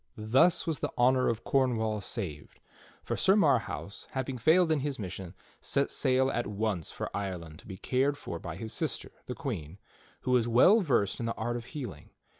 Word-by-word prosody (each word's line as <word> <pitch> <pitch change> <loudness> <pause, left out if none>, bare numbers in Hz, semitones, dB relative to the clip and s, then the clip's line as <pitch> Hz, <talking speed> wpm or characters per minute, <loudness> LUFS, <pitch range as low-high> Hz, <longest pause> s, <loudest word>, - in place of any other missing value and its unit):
Thus 130 +11 +3
was 160 -4 -1
the - - -1
honor 130 +1 +4
of 115 0 -2
Cornwall 110 -6 +1
saved; 85 -10 -6 0.4
for - - -2
Sir 195 +1 +4
Marhaus, 115 - 0
hav 130 0 -2
ing 130 -2 -4
failed 165 +4 +4
in 155 - +3
his 140 -1 -2
mission, 95 -2 -6 0.2
set 140 - 0
sail 130 0 +2
at 120 - -1
once 105 -5 -2
for - - -5
Ireland 90 -5 -5
to - - -15
be 95 -2 -7
cared 135 +7 +1
for 85 - -6
by 85 -1 -6
his 110 +4 -6
sister, - - -2 0.2
the - - -4
Queen, 80 +4 -5 0.4
who 130 - -2
was 120 -2 +3
well 130 - +6
versed 120 - +1
in 115 - -2
the 115 - -2
art 120 +2 -2
of 120 -1 -5
healing. 125 - -7
120 Hz, 195 wpm, -30 LUFS, 100-135 Hz, 0.4 s, well